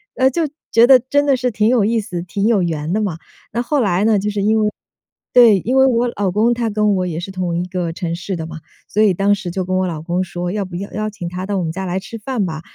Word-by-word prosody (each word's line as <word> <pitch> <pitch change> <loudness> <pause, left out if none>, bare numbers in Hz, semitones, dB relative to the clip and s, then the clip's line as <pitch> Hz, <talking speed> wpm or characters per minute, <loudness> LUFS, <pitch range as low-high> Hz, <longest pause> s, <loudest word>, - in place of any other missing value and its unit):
呃， 260 0 +4
就 325 +3 0 0.2
觉 230 +1 +6
得 265 -1 +8
真 285 +4 0
的 275 -2 +3
是 250 0 -1
挺 210 0 +1
有 240 -5 +3
意 230 +2 +1
思、 180 -5 -5
挺 200 +3 -1
有 215 -5 +3
缘 160 -2 -2
的 215 - +1
嘛。 190 -6 -2 0.3
那 235 - -1
后 280 +3 0
来 195 -3 +1
呢， 220 -1 +4
就 205 +2 -2
是 205 -1 -2
因 215 +2 +2
为 210 - +2 0.6
对， 230 -5 +7
因 250 +8 0
为 265 - +6
我 245 -1 +2
老 195 -2 0
公 220 +5 +2
他 235 -1 -1
跟 210 -1 +2
我 185 -1 0
也 165 -2 -3
是 175 - -6
同 180 -2 -2
一 175 - -1
个 180 -2 -3
城 170 -1 -3
市 180 +3 -4
的 160 -2 -5
嘛。 160 0 -8 0.3
所 215 - +1
以 205 -3 +4
当 200 +3 +2
时 190 -3 -6
就 185 +2 -2
跟 185 +1 -1
我 185 - +1
老 160 -3 -4
公 175 +3 -1
说， 175 -1 -4
要 205 0 -2
不 185 -2 -9
要 200 +2 -6
邀 215 +1 -2
请 190 -5 -6
他 180 +1 -5
到 200 0 -2
我 - - -1
们 160 - -2
家 190 +3 -5
来 180 +1 -2
吃 195 +4 -8
饭 225 -1 -2
吧， 160 -2 -5
200 Hz, 310 characters per minute, -18 LUFS, 180-225 Hz, 0.6 s, 得